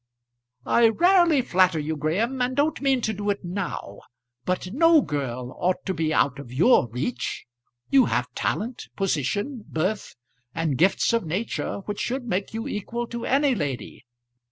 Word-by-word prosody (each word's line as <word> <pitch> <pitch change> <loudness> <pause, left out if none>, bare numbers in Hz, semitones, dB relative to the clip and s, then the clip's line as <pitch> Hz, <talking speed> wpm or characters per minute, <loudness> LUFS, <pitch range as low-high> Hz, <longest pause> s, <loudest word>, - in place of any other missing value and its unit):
"I 235 -1 +5
rarely 345 - +4
flatter 185 -5 +3
you, 155 +1 -2
Graham, 205 - -1
and 250 +1 0
don't 290 +3 +1
mean 270 -2 +2
to 220 - -1
do 205 0 -3
it 200 -2 -2
now; 175 - -5 0.5
but 185 +1 -2
no 330 +2 +5
girl 125 -4 -4
ought 180 +1 0
to 190 - -1
be 160 -2 -1
out 140 0 +2
of 125 -4 -9
your 135 - +4
reach. 125 0 -3 0.5
You 270 -3 +6
have 125 +1 -1
talent, 235 +4 -3
position, 200 - -1
birth, 185 +6 -2 0.4
and 165 -4 0
gifts 190 +6 +3
of 230 - +2
nature, 190 +4 -3
which 205 -1 -4
should 255 +1 -2
make 195 -3 -2
you 225 +1 -4
equal 235 +4 -3
to 235 0 -5
any 275 +1 +3
lady. 145 - -4
200 Hz, 160 wpm, -25 LUFS, 155-245 Hz, 0.5 s, You